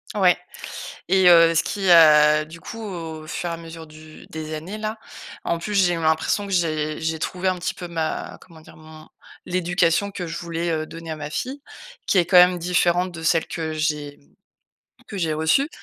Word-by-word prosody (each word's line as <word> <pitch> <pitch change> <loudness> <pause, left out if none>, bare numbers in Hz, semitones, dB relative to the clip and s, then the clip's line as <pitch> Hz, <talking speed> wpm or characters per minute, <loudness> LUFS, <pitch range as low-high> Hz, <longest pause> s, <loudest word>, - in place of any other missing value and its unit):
Ouais 185 -4 +4 0.7
et 190 0 +4
heu, 165 -1 +7
ce 160 - +3
qui, 195 -3 -2
heu, 150 -2 +7
du 160 +2 -12
coup, 225 +6 -9
au 165 -6 -7
fur 175 +2 -4
et - - -3
à - - -5
mesure 165 0 -10
du 155 0 -14
des 155 0 -5
années, 180 +8 -7
là, 215 +1 -4 0.5
en 170 - -1
plus, 205 +5 -4
j'ai 180 -3 +4
eu 165 - -3
l'impression 160 +6 +1
que - - -7
j'ai 155 -4 -1
j'ai 160 0 -2
trouvé 185 +3 -1
un 185 - 0
petit 180 - -3
peu 175 - -7
ma 165 -2 -4
comment 165 -3 -16
dire? - - -16
Mon 155 0 -14 0.4
l'éducation 175 +1 +1
que 195 -3 -6
je 165 0 -6
voulais, 170 0 -3
heu, 155 -1 -2
donner 165 0 -8
à - - -3
ma 145 -1 -6
fille, 260 - -4 0.5
qui - - +2
est 175 - +4
quand 180 +2 +4
même 180 0 +7
différente 175 +1 +1
de 170 -2 -9
celle 165 0 +2
que 160 -2 -4
j'ai, 150 -2 -2
mmh, - - -30 0.7
que 200 - -7
j'ai 160 -3 0
reçue. 160 - +2
165 Hz, 210 wpm, -22 LUFS, 155-180 Hz, 0.7 s, heu